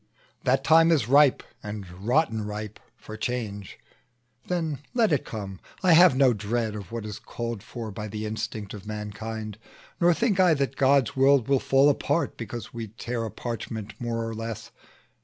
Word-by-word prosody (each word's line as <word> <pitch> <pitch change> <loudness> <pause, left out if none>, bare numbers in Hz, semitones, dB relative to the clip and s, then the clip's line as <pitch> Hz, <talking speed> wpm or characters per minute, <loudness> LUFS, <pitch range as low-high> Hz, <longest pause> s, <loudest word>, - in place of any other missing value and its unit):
The 130 +1 +4
time 160 +4 +5
is 140 -10 +2
ripe, 140 +1 +5 0.2
and 105 -2 -6
rotten 110 - 0
ripe, 105 0 -6 0.2
for 110 - -9
change; 110 -4 -4 0.7
Then 165 -5 -1 0.2
let 225 -6 +3
it 140 - 0
come: 100 -4 -6 0.2
I 180 -2 +6
have 175 -3 +7
no 130 -2 +5
dread 110 +2 -2
of 100 -4 -8
what 115 -2 -4
Is 105 -2 -6
called 115 -3 -5
for 115 0 -7
by 105 +2 -6
the 105 +1 -5
instinct 110 -1 -4
of 105 -1 -9
mankind; 110 0 -5 0.4
Nor 175 -1 +4
think 210 -3 +1
I 180 -4 +5
that 140 -1 -1
God's 135 -1 +3
world 135 -2 +4
will 135 -1 +3
fall 135 +2 +4
apart, 145 +3 +1
Because 115 0 -7
we 115 -1 -5
tear 115 +2 -4
a - - -4
parchment 110 -2 -5
more 115 -1 -2
or 115 - -4
less. 115 0 -6
115 Hz, 175 wpm, -26 LUFS, 105-140 Hz, 0.7 s, have